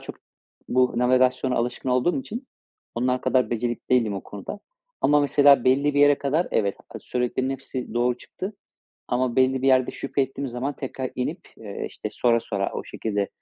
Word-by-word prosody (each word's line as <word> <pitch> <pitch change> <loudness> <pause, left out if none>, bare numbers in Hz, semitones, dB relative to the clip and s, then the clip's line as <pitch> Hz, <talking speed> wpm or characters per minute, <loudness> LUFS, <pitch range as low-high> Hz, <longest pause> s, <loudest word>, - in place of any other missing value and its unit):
çok - - -9 0.5
bu 125 0 +3
navigasyona 130 +1 +3
alışkın 120 +2 -2
olduğum 130 - +2
için 255 +1 -7 0.5
onlar 125 +1 0
kadar 130 -1 +2
becerikli 120 0 -2
değilim 115 -5 +2
o 95 - -4
konuda. 100 - -8 0.4
Ama 145 0 +4
mesela, 145 -2 +5
belli 140 +3 +3
bir 145 - +3
yere 145 -1 +6
kadar 150 +5 0
evet, 100 -2 +1 0.2
a - - -4
söylediklerinin 125 +2 -1
hepsi 130 -3 -6
doğru 120 +1 +1
çıktı. 190 +3 -7 0.6
Ama 125 -1 0
belli 130 0 +3
bir - - +1
yerde 130 -1 +4
şüphe 140 0 -1
ettiğim 135 +1 -4
zaman 125 +4 -3
tekrar 130 -1 -4
inip, 125 - -3 0.2
eee, - - -6
işte, - - -6
sora 115 -1 +2
sora 100 -3 -2
o - - -5
şekilde 100 -3 -2
130 Hz, 175 wpm, -24 LUFS, 120-140 Hz, 0.6 s, yere